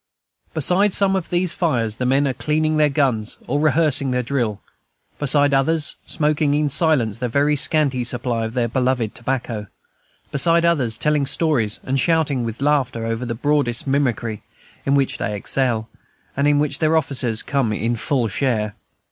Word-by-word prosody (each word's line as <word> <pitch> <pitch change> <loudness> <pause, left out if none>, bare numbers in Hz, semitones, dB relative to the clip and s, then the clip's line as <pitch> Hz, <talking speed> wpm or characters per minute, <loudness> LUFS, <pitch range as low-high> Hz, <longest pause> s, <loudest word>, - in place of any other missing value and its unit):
Beside 180 +6 +2
some 195 -1 +3
of 185 -3 -3
these 175 0 +1
fires 120 - 0
the 125 - -1
men 140 +2 +2
are 130 - -1
cleaning 155 +4 0
their 150 -1 +4
guns 130 -7 -1
or 145 +3 -1
rehearsing 150 -2 +2
their 125 0 0
drill, 120 -5 -2 0.6
beside 145 0 +3
others, 150 +3 +1
smoking 150 -1 +1
in 150 0 +1
silence 130 - +1
their 125 - -2
very 145 +4 +2
scanty 140 -3 +2
supply 120 -1 -2
of 110 +2 -6
the 120 -2 +1
beloved 125 -2 -1
tobacco, 115 -4 -4 0.6
beside 170 +4 +3
others, 130 -10 +1
telling 150 -2 +1
stories 135 -9 0
and 135 +1 -1
shouting 150 -4 +1
with 115 +3 -5
laughter 130 -6 0
over 115 +2 -3
the 115 - -3
broadest 140 -2 0
mimicry, 125 -6 -1 0.5
in 140 - +3
which 135 -2 0
they 105 - -2
excel, 115 +1 -1 0.5
and 140 +1 +1
in 145 0 +3
which 145 -1 0
the 155 0 +2
officers 135 -8 0
come 135 -6 0
in 115 +2 -1
for - - -8
a - - -6
full 130 -5 +1
share. 110 -2 -1
135 Hz, 175 wpm, -20 LUFS, 120-150 Hz, 0.6 s, their